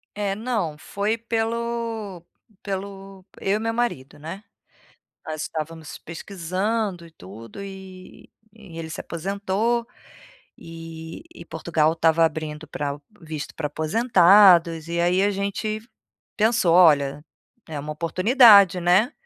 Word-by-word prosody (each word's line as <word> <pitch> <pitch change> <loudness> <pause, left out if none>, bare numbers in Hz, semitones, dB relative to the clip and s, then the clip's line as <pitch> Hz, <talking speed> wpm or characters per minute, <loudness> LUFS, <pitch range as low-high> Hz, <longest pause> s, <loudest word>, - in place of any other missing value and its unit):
É, 200 -1 -1
não. 215 -8 -2
Foi 205 +7 -2
pelo 230 -4 -3 0.4
pelo 195 -1 -7 0.2
eu 195 +2 +1
e - - -1
meu 225 0 -1
marido, 225 - -3
né? 165 +7 -8 0.8
Nós 155 -1 -4
estávamos 160 -1 -6
pesquisando 185 +2 -3
e - - -19
tudo, 110 - -12
eh, 200 - -5
e 190 -1 -12 0.5
ele 160 -1 -6
se 155 - -5
aposentou, 200 +6 -2 0.7
eh, 165 0 -9
e 170 - -11
Portugal 160 -1 +1
estava 165 0 +3
abrindo 155 -1 -3
pra 145 -1 -3
ao 145 +1 -7 0.2
visto 155 -3 -7
pra 150 - -3
aposentados 175 - +5
e 170 0 -1
aí 180 +2 +2
a 205 - +3
gente 200 +2 -3 0.6
pensou: 220 -5 +3
"Olha, 150 -5 +4 0.4
é 155 -2 -5
uma 150 +1 -5
oportunidade, 200 - +6
né?". 185 - +3
185 Hz, 125 wpm, -23 LUFS, 160-210 Hz, 0.8 s, oportunidade